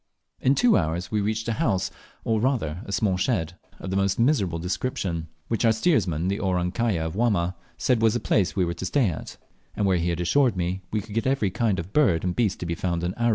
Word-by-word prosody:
In 135 +2 +3
two 245 +7 +4
hours 85 +2 -2
we 105 -1 +1
reached 110 +2 -2
a 115 - +1
house, 95 - +1 0.3
or 110 -1 +1
rather 105 - 0
small 100 -1 +1
shed, 90 -5 0 0.2
of 95 - -6
the - - -1
most 100 0 +1
miserable 115 - +2
description, 90 -2 -2 0.2
which 115 0 -1
our 115 - +5
steersman, 100 - +1
the 100 +2 -1
"Orang 90 -3 0
kaya" 105 -8 0
of 80 - -4
Wamma, 100 -6 +1 0.2
said 125 -3 +1
was 115 0 +3
the - - +1
place 95 -6 +1
we 95 -3 +2
were 85 - -2
to 85 +2 -6
stay 125 -1 +2
at, 80 - -7 0.4
and 105 - 0
where 95 -2 +3
he 85 +1 0
had 85 0 -2
assured 120 +5 +2
me 90 +2 -2
we 110 - -1
could 105 +1 -11
get 115 +3 0
every 130 -8 +1
kind 110 -1 0
of 85 +4 -6
bird 110 - +3
and 90 -1 -1
beast 110 -6 0
to - - -3
be 85 - -2
found 85 0 -2
in 90 +1 -1
Aru. 120 0 +1
95 Hz, 240 wpm, -25 LUFS, 90-115 Hz, 0.4 s, our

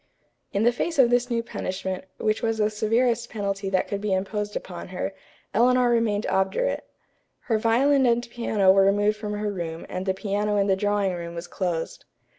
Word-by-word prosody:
In 200 - 0
the 240 - +5
face 325 +7 -2
of 250 -3 +5
this 245 +1 +2
new 230 -1 0
punishment, 190 -3 -4
which 215 0 0
was 225 -2 0
the 215 0 +1
severest 230 +2 +1
penalty 200 -2 -3
that 185 -1 +1
could 200 -1 -3
be 210 -2 0
imposed 205 +2 -3
upon 175 -2 -6
her, 185 +1 -4 0.4
Eleanor 245 +2 +4
remained 225 -3 +1
obdurate. 190 - 0 0.5
Her 225 -3 0
violin 260 +4 +3
and 240 0 +1
piano 220 -5 +2
were 195 0 +5
removed 205 +2 +2
from 210 -1 -4
her 210 0 -2
room 165 -3 -5
and 185 +1 -4
the 190 - +1
piano 205 +1 -1
in 200 - +3
the 195 -1 +3
drawing 205 -1 0
room 170 -1 -6
was 170 +1 -5
closed. 175 -3 -3
210 Hz, 190 wpm, -25 LUFS, 190-235 Hz, 0.5 s, the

